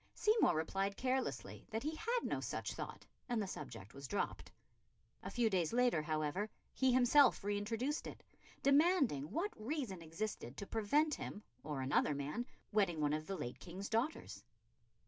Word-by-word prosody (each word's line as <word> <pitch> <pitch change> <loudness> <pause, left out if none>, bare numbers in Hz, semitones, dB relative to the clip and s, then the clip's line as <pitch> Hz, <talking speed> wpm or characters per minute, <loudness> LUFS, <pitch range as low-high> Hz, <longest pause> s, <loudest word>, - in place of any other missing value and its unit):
Seymour 430 - +4
replied 195 +5 -1
carelessly 260 0 -2
that 225 0 -2
he 305 +2 -1
had 465 +9 -1
no - - -1
such - - -3
thought, - - -6 0.2
and 240 -2 +1
the 210 - 0
subject 125 - -7 0.2
dropped. 205 - -2 0.7
A - - -5
few 240 -2 +2
days 185 -5 +1
later, 245 -9 +3
however, 155 +6 -1 0.2
he 260 -1 +3
himself 255 0 +6
re 205 0 0
introduced 230 +8 -1
it, - - -9 0.4
demanding 280 - +4
what 370 - -1
reason 225 - -3
existed 165 - -4
to 200 - -4
prevent 285 +10 +2
him, 210 -5 -5 0.2
or 145 -3 -3
another 140 +2 +2
man, 150 - -3 0.2
wedding 195 -7 +2
one 150 -1 +2
of 155 0 -2
the 195 - -3
late 120 - -5
King's 185 +3 -6
daughters? 225 - -1
210 Hz, 160 wpm, -37 LUFS, 155-260 Hz, 0.7 s, himself